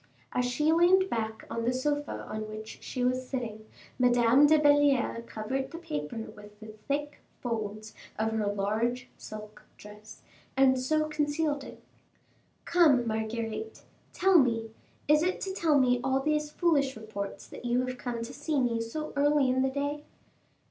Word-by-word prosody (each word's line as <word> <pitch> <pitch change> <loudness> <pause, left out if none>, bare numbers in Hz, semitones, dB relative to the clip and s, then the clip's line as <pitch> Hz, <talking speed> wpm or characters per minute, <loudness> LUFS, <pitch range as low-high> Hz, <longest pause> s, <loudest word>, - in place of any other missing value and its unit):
As 250 - +1
she 300 +6 +1
leaned 370 +3 +4
back 220 -1 -3
on 230 - -3
the 240 - +2
sofa 290 +3 -2
on 215 0 -5
which 215 0 -8
she 250 - -4
was 255 0 0
sitting, 220 -5 -5 0.3
Madame 245 +3 +5
de 310 +1 +6
Belliere 290 -5 +3
covered 265 +5 -3
the 330 - -8
paper 150 - -5 0.2
with 210 0 -14
the 215 0 -10
thick 290 +1 -2 0.2
folds 215 -3 -4 0.2
of 220 +1 0
her 220 -2 -1
large 220 +5 -1
silk 215 0 -10 0.2
dress, 210 +1 -13 0.3
and 260 -1 +5
so 310 +4 +1
concealed 295 -1 -1
it. - - -12 0.8
"Come, 300 -8 +4
Marguerite, 225 - -3 0.3
tell 380 -2 +5
me, 230 -4 +1 0.4
is 300 +1 +5
it 365 +3 0
to 385 - -3
tell 320 -6 +2
me 250 -1 +3
all 265 0 +2
these 300 +1 0
foolish 295 -5 +1
reports 215 -2 -6
that - - -11
you 245 +1 +1
have 255 -1 -5
come 235 -2 -4
to 230 - -7
see 295 0 -1
me 235 -3 +1
so 305 +7 -5
early 285 -2 +3
in 260 +1 +1
the 265 - +2
day?" 285 +2 -3
255 Hz, 160 wpm, -29 LUFS, 220-295 Hz, 0.8 s, de